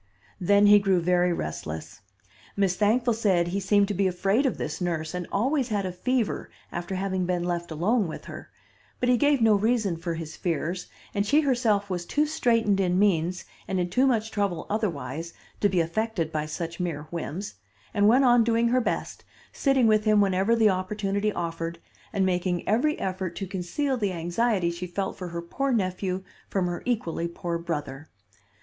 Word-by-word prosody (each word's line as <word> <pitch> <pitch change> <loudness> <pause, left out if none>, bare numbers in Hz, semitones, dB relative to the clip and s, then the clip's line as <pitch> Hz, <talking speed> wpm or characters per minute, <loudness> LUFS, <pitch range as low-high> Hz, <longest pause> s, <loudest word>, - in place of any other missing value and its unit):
Then 200 +2 +4
he 205 0 +8
grew 195 -3 +2
very 180 +1 +2
restless. 75 - -5 0.6
Miss 195 -2 +2
Thankful 230 +5 +2
said 190 -6 +2
he 195 +3 -1
seemed 200 +1 +3
to - - 0
be 195 0 +2
afraid 195 +9 +1
of 255 - -2
this - - -4
nurse, 165 -2 -2
and 180 -1 -4
always 260 +5 +1
had 205 -4 -1
a 185 - -2
fever 235 +5 -1 0.2
after 175 +2 -4
having 190 -1 -1
been 180 -1 0
left 175 -1 -2
alone 190 +7 +1
with 155 - -7
her; - - -9 0.5
but 250 - +1
he 250 - +5
gave 290 +1 +3
no 225 -1 +5
reason 210 -3 +1
for 165 0 -3
his 160 -1 -6
fears, 175 +1 -2 0.3
and 200 - +1
she 285 +9 +3
herself 235 -8 +1
was 175 -1 -2
too 300 +1 +2
straitened 230 -9 +2
in 180 -2 +2
means 185 -2 +1 0.2
and 190 -1 -1
in 175 0 -1
too 260 +5 +3
much 225 -3 +1
trouble 200 -6 -1
otherwise 165 - -3 0.3
to 205 - +3
be 185 -2 +1
affected 170 0 -1
by 155 -1 -2
such 165 +2 -5
mere 165 -5 -2
whims, 175 +3 -4 0.4
and 205 0 +3
went 250 +5 +5
on 240 -1 +6
doing 230 +1 +2
her 255 +1 +3
best, - - -3 0.3
sitting 270 -3 +2
with 215 -1 +3
him 215 -1 +4
whenever 195 +3 +3
the 225 -2 +4
opportunity 200 +2 0
offered, 165 -2 -4 0.3
and 195 -2 +1
making 180 -1 -1
every 255 +9 +2
effort 185 -2 -3
to 195 - -4
conceal 195 +9 -2
the 205 -4 0
anxiety 175 +2 0
she 175 +1 -5
felt 190 +2 -3
for 180 - -6
her 170 0 -5
poor 275 +10 -2
nephew 185 -3 -1 0.3
from 190 -2 0
her 175 -1 -3
equally 170 -8 -1
poor 170 0 -4
brother. 155 -3 -5
190 Hz, 185 wpm, -26 LUFS, 175-220 Hz, 0.6 s, he